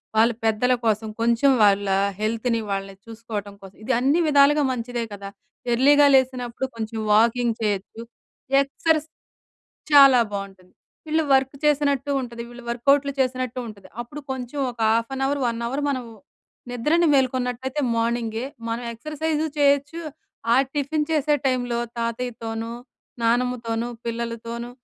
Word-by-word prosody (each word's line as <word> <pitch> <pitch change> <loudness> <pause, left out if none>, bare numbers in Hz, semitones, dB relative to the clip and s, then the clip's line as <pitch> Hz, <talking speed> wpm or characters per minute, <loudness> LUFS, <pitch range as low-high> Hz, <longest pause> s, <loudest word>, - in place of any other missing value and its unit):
వాళ్ళు 230 +2 +4
పెద్దల 225 +3 +2
కోసం 220 0 +1
కొంచెం 235 +4 +3
వాళ్ళ 200 0 +4 0.3
హెల్త్‌ని 230 +2 0
వాళ్ళని 195 0 -4
చూసుకోవటం 220 -3 -6
కోసం, 195 -1 -13
ఇది 260 - +1
అన్ని 275 +6 +2
విధాలుగా 290 +1 +5
మంచిదే 240 -1 -3
కదా! 200 -1 -7 0.4
ఎర్లీగా 285 +4 +5
లేసినప్పుడు 255 -1 +1
కొంచెం 225 0 -5
వాకింగ్ 230 +2 +3
చేయొచ్చు. 210 +1 -2 0.6
ఎక్సర్‌సైజ్ 310 +3 0 0.9
చాలా 275 -3 +8
బాగుంటుంది. 195 -2 -7 0.3
వీళ్ళు 315 +1 +1
వర్క్ 270 +1 +2
చేసినట్టు 285 -2 +1
ఉంటది. 235 -2 -6
వీళ్ళు 240 0 -11
వర్కౌట్‌లు 280 +4 +2
చేసినట్టు 255 -1 -1
ఉంటుది. 205 -3 -12
అప్పుడు 260 +5 -7
కొంచెం 260 +1 -5
ఒక 240 - -15
హాఫ్ 230 +2 +1
అన్ 270 - -3
అవర్, 285 +1 -1
1 235 0 -2
అవర్ 270 +5 -2
మనం 260 -3 -2 0.7
నిద్రని 300 +8 +2
మేల్కొన్నట్లయితే 260 +1 0
మార్నింగే 230 0 -1 0.2
మనం 230 +2 -3
ఎక్సర్‌సైజ్ 305 +5 -3 0.2
చేయొచ్చు 285 +3 +2 0.5
ఆహ్, 265 +2 +4
టిఫిన్ 295 +1 -1
చేసే 300 -1 +2
టైమ్‌లో 245 -2 0 0.2
తాతయ్యతోను, 230 -1 -4 0.5
నానమ్మతోను, 235 -1 0 0.2
పిల్లలతోనూ 235 0 -4
245 Hz, 125 wpm, -23 LUFS, 230-275 Hz, 0.9 s, చాలా